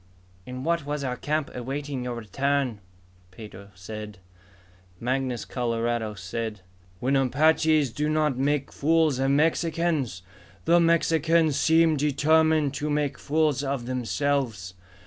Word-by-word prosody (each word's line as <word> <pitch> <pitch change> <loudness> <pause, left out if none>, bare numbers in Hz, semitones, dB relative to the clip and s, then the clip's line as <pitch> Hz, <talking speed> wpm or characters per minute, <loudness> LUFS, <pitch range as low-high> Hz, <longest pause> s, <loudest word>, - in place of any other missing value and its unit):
"In 125 0 -6
what 170 +1 0
was 145 0 -3
our 125 -2 -2
camp, 150 +2 -2
awaiting 135 +1 -4
your 125 -1 -4
return," 130 +2 -1 0.5
Pedro 100 0 -11
said. 105 +2 -8 0.8
Mangus 125 0 -2
Coloradus 115 -3 -2
said, 105 +2 -5 0.4
"When 130 +4 +1
Apaches 150 +1 +3
do 150 +4 -1
not 155 -3 +1
make 140 +1 0
fools 155 -2 +2
of 135 0 +1
Mexicans, 155 - 0 0.4
the 170 +1 +5
Mexicans 165 -2 +3
seem 160 0 +4
determined 150 +1 +2
to 150 +2 -3
make 145 -1 -1
fools 150 -2 +1
of 135 -3 -2
themselves. 125 -5 -2
140 Hz, 120 wpm, -26 LUFS, 120-155 Hz, 0.8 s, the